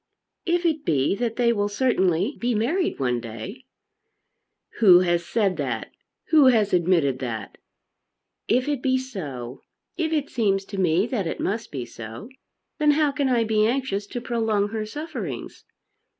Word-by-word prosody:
"If 345 0 +1
it 310 -3 +1
be 140 - +1
that 235 -2 -2
they 235 -1 +3
will 205 -2 0
certainly 205 - +1
be 240 -1 0
married 315 - 0
one 125 -3 0
day 115 - -8 0.5
" - - -25
"Who 185 -5 +8
has 175 -1 +1
said 195 -2 0
that? 125 -7 -3 0.4
Who 305 -3 +6
has 215 -5 +3
admitted 170 -7 +2
that?" 115 -5 -5 0.9
"If 255 +3 +2
it 290 -4 -1
be 260 0 +2
so; 145 - -6 0.4
if 325 -2 -1
it 300 -3 -1
seems 200 -5 +1
to 200 -1 -6
me 180 +1 +3
that 230 -8 -2
it - - -4
must 220 +3 -2
be 130 -4 -4
so, 115 - -9 0.5
then 300 -1 +3
how 300 -2 +3
can 280 -1 0
I 240 -2 +3
be 215 -1 +2
anxious 230 -5 -1
to 245 - -5
prolong 225 -4 0
her 215 0 -4
sufferings? 235 - -6
215 Hz, 165 wpm, -24 LUFS, 170-255 Hz, 0.9 s, Who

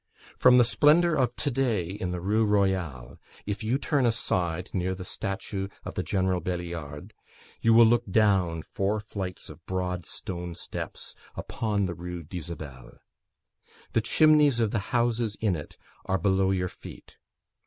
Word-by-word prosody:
From 125 0 +6
the 125 - +7
splendour 155 +8 +4
of 125 -5 +1
to 145 - -2
day 120 -8 +1
in 95 -2 -4
the 90 0 -3
Rue 105 +5 +1
Royale, 95 - 0 0.3
if 105 +2 -3
you 115 +5 +1
turn 140 -3 +1
aside, 90 -7 -1
near 95 0 -1
the 95 -1 -8
statue 95 0 -4 0.2
of - - -5
the 95 - -2
General 95 +1 0
Beliard, 85 -4 -5 0.5
you 115 0 +5
look 115 -1 +5
down 95 -6 +2
four 100 +2 -1
flights 95 -3 -6
of - - -14
broad 90 -1 -2
stone 85 -2 -5
steps - - -7 0.2
upon 105 -3 -1
the 90 - -3
Rue 90 0 -6
d'Isabelle. 75 -7 -8 1.0
The 115 - +3
chimneys 150 +1 +4
of 110 -3 +1
the 115 - 0
houses 120 -3 +1
in 105 -5 +1
it 75 - -8 0.3
are 95 - +1
below 95 -1 +2
your 90 -1 +1
feet. - - -12
95 Hz, 155 wpm, -27 LUFS, 90-115 Hz, 1.0 s, the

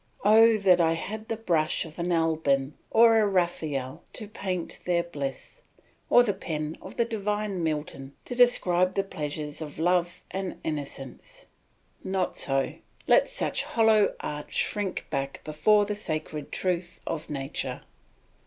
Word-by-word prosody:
Oh 225 +1 +7
that 185 -4 +4
I 165 -1 +3
had 215 +6 -5
the 225 - -2
brush 170 -9 +1
of 160 +1 -12
an 175 +1 -1
Alban 155 -4 +1 0.2
or 225 0 +6
a 210 - +3
Raphael 160 -6 -1
to 215 - -2
paint 185 -5 -4
their 175 -1 +2
bliss, 145 - -6 0.5
or 245 - +7
the 210 -4 0
pen 155 -4 -4
of - - -10
the 235 - +3
divine 210 -3 -2
Milton 150 -3 -3
to - - -5
describe 185 -7 +3
the 195 - +2
pleasures 150 -4 -4
of 150 -2 -7
love 175 +1 +1
and 190 0 -4
innocence! 140 -4 -6 0.6
Not 190 -1 -1
so; 135 -1 +1 0.3
let - - +4
such - - -1
hollow 220 -2 +3
arts 150 0 -6
shrink 205 -3 0
back 140 -2 -3
before 205 +8 +3
the 210 - -2
sacred 155 -7 -4
truth 180 -1 -2
of 160 -1 -4
nature. 135 -2 -4
175 Hz, 145 wpm, -27 LUFS, 150-210 Hz, 0.6 s, Oh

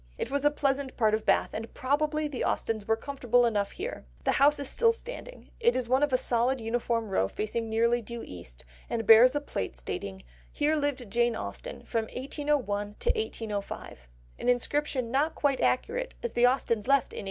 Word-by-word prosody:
It - - -4
was 280 0 0
a 290 - +6
pleasant 275 -2 -1
part 220 -3 +3
of 215 0 -1
Bath, 195 - +3
and 225 +1 -5
probably 300 +3 0
the 280 -4 -4
Austens 220 -2 -1
were 225 - +3
comfortable 245 -1 +1
enough 205 -3 0
here. 435 +7 -5 0.2
The - - +2
house 290 +2 +4
is 280 - +1
still 460 - +3
standing; - - -9
it 475 +1 +3
is 255 -2 -1
one 260 +3 +3
of 295 -1 +2
a 255 - +4
solid 250 +2 +2
uniform 230 -1 -1
row 95 - +1
facing 220 - -3
nearly 235 +2 +2
due 235 +1 -7
east, 85 -11 -11 0.2
and 225 -2 -2
bears 230 +5 +8
a - - +2
plate 95 - -4
stating 95 +10 -6 0.3
"Here 300 +2 +1
lived 285 -7 -2
Jane 235 +1 +2
Austen - - -7
from 225 -2 -1
1801 285 +3 -2 0.5
1805," 210 - -5 0.3
an 245 - 0
inscription 255 0 0
not 290 +5 +1
quite 280 -2 +1
accurate 485 - 0
as 475 - -3
the 240 +1 +5
Austens 235 -4 0
left 275 -1 +2
in - - -8
1804. - - -3
245 Hz, 190 wpm, -28 LUFS, 225-290 Hz, 0.5 s, bears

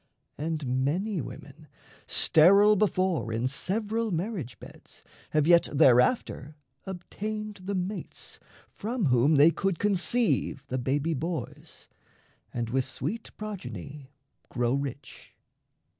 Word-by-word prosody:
And 145 -4 -2
many 180 +6 -1
women, 120 - -11 0.4
sterile 200 +6 +5
before 185 - +1
In 115 +3 0
several 215 - -1
marriage 175 - -3
beds, - - -14 0.3
have 155 -1 +2
yet 170 +1 +5
thereafter 145 - +3 0.3
Obtained 210 +2 -6
the 200 +1 -2
mates 190 +3 -5 0.3
from 225 0 -3
whom 130 +3 +4
they 145 +4 +7
could 190 0 -1
conceive 195 - 0
The 130 - -1
baby 145 +6 0
boys, 160 +3 -6 0.6
and 120 -1 -3
with 130 0 +1
sweet 210 +11 -5
progeny 145 - -7 0.4
Grow 120 0 0
rich. 140 0 -6
165 Hz, 110 wpm, -28 LUFS, 135-200 Hz, 0.6 s, they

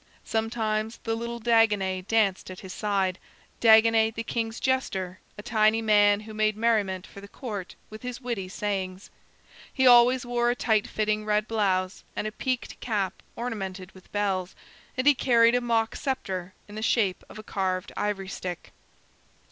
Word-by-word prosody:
Sometimes 220 0 -1
the 225 - -1
little 235 +1 -4
Dagonet 210 -5 +2
danced 210 -5 +1
at 185 - -9
his 190 -2 -8
side, 195 -3 -1 0.4
Dagonet 225 0 +5
the 230 - -3
king's 225 0 -3
jester, 190 -9 -1 0.2
a 205 - -8
tiny 220 -1 +3
man 205 -2 +4
who 215 0 -10
made 215 0 +1
merriment 210 -5 +1
for 200 - -12
the 200 - -11
Court 205 -5 -7 0.2
with 215 - -9
his 250 -1 -5
witty 235 -7 -4
sayings. 190 -1 -4 0.6
He 260 - +1
always 250 +1 +6
wore 240 0 +1
a 240 - +1
tight 220 -4 +1
fitting 215 0 -1
red 210 0 +1
blouse 190 -4 0
and - - -2
a 215 - -2
peaked 255 +3 -3
cap 200 -5 -2
ornamented 195 -6 -5
with 185 - -18
bells, 190 -3 -1 0.4
and 255 - 0
he 290 - +7
carried 235 -3 +4
a 245 - +2
mock 230 -2 0
scepter 190 - -3
in 205 - -12
the 215 - -5
shape 215 -4 +1
of - - -11
a 215 - -8
carved 185 -3 -2
ivory 200 -2 -2
stick. 180 -2 -6
215 Hz, 165 wpm, -27 LUFS, 195-230 Hz, 0.6 s, he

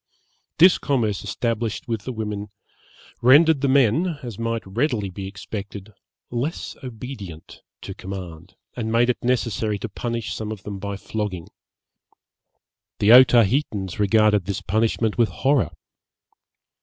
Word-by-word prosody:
This 180 +3 +6
commerce 115 -8 0
established 115 +2 -2
with 115 -4 -3
the 130 - -3
women 105 -3 -4 0.7
rendered 145 +4 +6
the 140 - +2
men, 140 - +3
as 115 -4 -7
might 115 0 -2
readily 105 -1 -1
be 95 +1 -6
expected, 100 +1 -8 0.4
less 130 +8 -3
obedient 110 - -9 0.2
to - - -7
command, 90 -2 -8 0.2
and 110 -2 -3
made 120 +2 +4
it - - -8
necessary 115 -4 0
to 115 - -5
punish 115 +1 -4
some 110 -1 -5
of 105 -3 -7
them 100 -2 -6
by 100 0 -4
flogging. 100 -4 -4 1.5
The 105 - +4
Otaheitans 115 -5 +4
regarded 105 -1 +3
this 100 0 -4
punishment 110 +2 0
with 115 -3 +4
horror. 135 +8 +1
110 Hz, 130 wpm, -23 LUFS, 100-125 Hz, 1.5 s, This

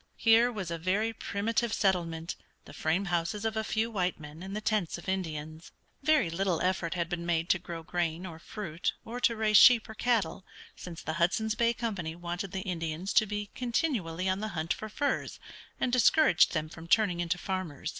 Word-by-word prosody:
Here 230 +2 +5
was 190 -7 -5
a 165 - -3
very 200 +6 0
primitive 225 +3 -1
settlement, 170 -5 0 0.3
the - - -12
frame 165 +5 0
houses 175 +4 -1
of 220 0 0
a 220 - 0
few 220 +1 -1
white 185 -5 -1
men 150 +2 -10
and 195 +2 -6
the - - -1
tents 215 -6 0
of 175 - -12
Indians. 160 -4 -4 0.3
Very 280 - +3
little 180 0 0
effort 180 -2 0
had 170 -2 -1
been 170 0 -4
made 170 0 0
to 190 - +3
grow 170 -2 -7
grain 170 +1 -2
or 165 -3 -8
fruit 205 +1 -3
or 240 +2 -5
to 235 -2 +2
raise 215 -1 +4
sheep 240 -1 +8
or 220 - -8
cattle, 215 -6 0 0.3
since 170 -2 -9
the 160 - -3
Hudson's 215 +5 +2
Bay 235 +1 +2
Company 195 -10 -3
wanted 175 +2 -5
the 190 - -3
Indians 170 0 -3
to 220 - +5
be 205 0 -4
continually 230 - -1
on 190 +1 +1
the 215 - -2
hunt 160 +2 0
for 215 - -7
furs, 285 +6 -2 0.4
and 250 - 0
discouraged 255 - +5
them 155 0 0
from 160 +1 -11
turning 195 -3 +3
into 175 +1 0
farmers. 180 -5 -4
185 Hz, 195 wpm, -30 LUFS, 170-220 Hz, 0.4 s, sheep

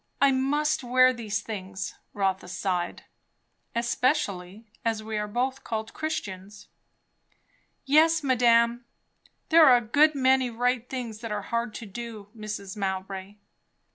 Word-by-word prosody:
I 280 -1 +5
must 295 +3 +1
wear 255 +1 +5
these 215 -3 -3
things." 195 -3 -6 0.2
Rotha 195 -1 0
sighed. 180 -1 -2 0.7
"Especially 235 - -1 0.2
as 225 -1 -1
we 220 0 -5
are 210 0 -1
both 260 +5 -2
called 220 -1 -4
Christians." 205 -9 -5 1.2
"Yes, 315 +3 +4
madame. 235 -2 +3 0.6
There 330 -1 +7
are 250 -2 +8
a - - -1
good 290 +7 +3
many 260 -1 +3
right 245 +1 -1
things 240 -5 -5
that 230 -1 -6
are 205 -1 -2
hard 235 0 -2
to 230 - -6
do, 215 -1 -8
Mrs. 210 -2 -6
Mowbray!" 190 0 -4
230 Hz, 130 wpm, -27 LUFS, 205-260 Hz, 1.2 s, are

